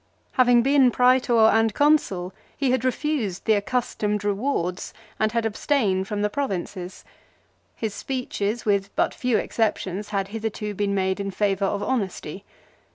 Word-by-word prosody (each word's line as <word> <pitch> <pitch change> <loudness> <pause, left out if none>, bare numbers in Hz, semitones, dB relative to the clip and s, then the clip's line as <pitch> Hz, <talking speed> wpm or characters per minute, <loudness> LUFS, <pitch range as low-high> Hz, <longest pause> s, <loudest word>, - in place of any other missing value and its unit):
Having 245 -2 +4
been 270 -1 +5
Prsetor 250 -2 +4
and 225 -1 +2
Consul 245 -12 +2 0.2
he 270 -2 +1
had 255 -1 +1
refused 255 - -1
the 220 - +4
accustomed 210 -1 -1
rewards 200 -4 -2 0.2
and 215 0 +2
had 230 0 0
abstained 210 -4 0
from 205 0 -2
the - - +3
Pro 280 +4 -1
vinces. 180 -1 -6 0.7
His 220 -3 -3
speeches 235 -3 -3
with 200 -2 +1
but - - +1
few 250 -3 0
exceptions 210 -3 -2
had 195 -2 -2
hitherto 215 -1 -4
been 200 0 -1
made 190 0 0
in 200 0 -2
favour 195 0 0
of 200 +1 -1
honesty. 195 -7 -3
210 Hz, 150 wpm, -24 LUFS, 195-250 Hz, 0.7 s, been